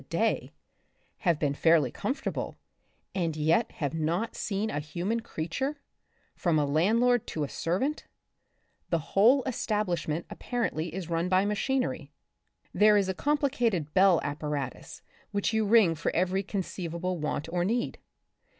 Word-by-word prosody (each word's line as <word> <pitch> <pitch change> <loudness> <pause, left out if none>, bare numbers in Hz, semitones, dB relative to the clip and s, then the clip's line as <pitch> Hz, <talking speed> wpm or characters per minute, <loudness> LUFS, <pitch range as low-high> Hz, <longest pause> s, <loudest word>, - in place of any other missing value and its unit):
a - - -16
day, - - 0 0.7
have 170 -4 +2
been 145 -2 0
fairly 155 -4 +3
comfortable, 270 - -3 0.6
and 165 -4 -1
yet 160 +9 +2
have 145 -4 -3
not 165 +8 -1
seen 210 +1 -2
a - - -1
human 175 +9 -2
creature, 235 - -3 0.5
from 170 -3 +1
a 150 - +2
land 165 +11 +2
lord 245 -1 +3
to 155 - -2
a - - -1
servant? 195 - -2 0.8
The 170 - +2 0.2
whole 245 +7 +5
establishment 180 - -1
apparently 175 -10 -2
is 180 0 -5
run 165 +2 0
by 185 +1 +3
machinery. 255 +6 -1 0.6
There 210 0 +6
is 195 -2 +1
a - - +1
complicated 245 - 0
bell 190 -2 +5
apparatus 145 -2 -4 0.3
which 205 +2 -1
you 220 -1 +2
ring 205 -5 +5
for 165 +1 -2
every 185 +2 +1
conceivable 180 -2 -3
want 150 0 -2
or 175 -1 +1
need. 235 +6 -1
185 Hz, 140 wpm, -28 LUFS, 160-220 Hz, 0.8 s, There